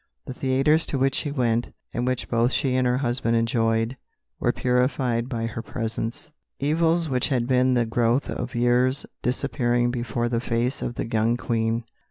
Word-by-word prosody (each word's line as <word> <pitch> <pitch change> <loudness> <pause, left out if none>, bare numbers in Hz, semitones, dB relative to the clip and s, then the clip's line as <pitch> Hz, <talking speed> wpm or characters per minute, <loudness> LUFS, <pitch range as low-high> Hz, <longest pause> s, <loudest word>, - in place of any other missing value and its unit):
The - - -6
theatres 135 +5 +2
to 140 - 0
which 135 0 +2
she 145 - -1
went, 120 -4 0 0.2
and 120 +1 -1
which 130 -1 -1
both 120 +1 +2
she 130 -2 +1
and 130 -1 +2
her 125 0 +2
husband 120 -2 0
enjoyed, 115 +1 +1 0.4
were - - +2
purified 125 -1 0
by 115 -2 -2
her 115 0 -4
presence; 115 +4 -2 0.3
evils 165 +3 +2
which 125 -3 0
had 125 -4 0
been 130 0 +3
the 120 -1 +2
growth 120 +3 +1
of - - -4
years 125 +3 +2 0.2
disappearing 120 -2 0
before 120 -1 -2
the 115 -1 -1
face 120 +2 -1
of 120 - -3
the - - -2
young 115 +1 +1
Queen." 115 -1 -1
120 Hz, 175 wpm, -24 LUFS, 115-130 Hz, 0.4 s, been